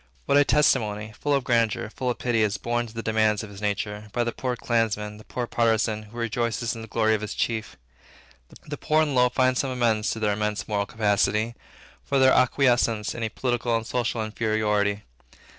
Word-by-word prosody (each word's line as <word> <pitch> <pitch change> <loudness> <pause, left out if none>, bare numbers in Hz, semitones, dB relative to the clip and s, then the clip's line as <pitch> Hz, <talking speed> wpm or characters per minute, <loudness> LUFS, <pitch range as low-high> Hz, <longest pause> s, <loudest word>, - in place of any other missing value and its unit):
What - - +2
a - - +6
testimony, 110 -8 +1
full 145 -1 +1
of 135 - 0
grandeur, 115 -3 +1
full 125 +1 -3
of 120 - -2
pity, 120 -2 0
is 105 -1 +1
borne 120 +1 -2
to 110 - -13
the 115 - -4
demands 110 -1 +1
of 105 - -9
his 100 0 -11
own 105 - +1
nature, 105 +1 -4
by 120 - +1
the 120 - -2
poor 125 +1 -3
clansman, 105 -3 -1
the 110 - -13
poor 125 +2 -4
partisan, 110 -2 +1
who 120 - -13
rejoices 115 0 -1
in 115 - -7
the 110 - -8
glory 110 0 +2
of 110 - 0
his 105 - -5
chief. 110 -2 -2 0.9
The 145 -1 -5
poor 155 +2 +2
and 150 - -1
the - - -2
low 125 0 +5
find 130 +1 +2
some 135 +1 0
amends 115 -4 +1
to 115 - -3
their 105 -2 +1
immense 105 0 -2
moral 100 -2 -1
capacity, 105 +1 +1 0.5
for 140 - 0
their 130 0 +5
acquiescence 120 -4 +2
in 115 - -7
a 110 - -1
political 120 0 -1
and 115 - -5
social 115 -2 -1
inferiority. 105 -2 0
115 Hz, 210 wpm, -25 LUFS, 105-120 Hz, 0.9 s, a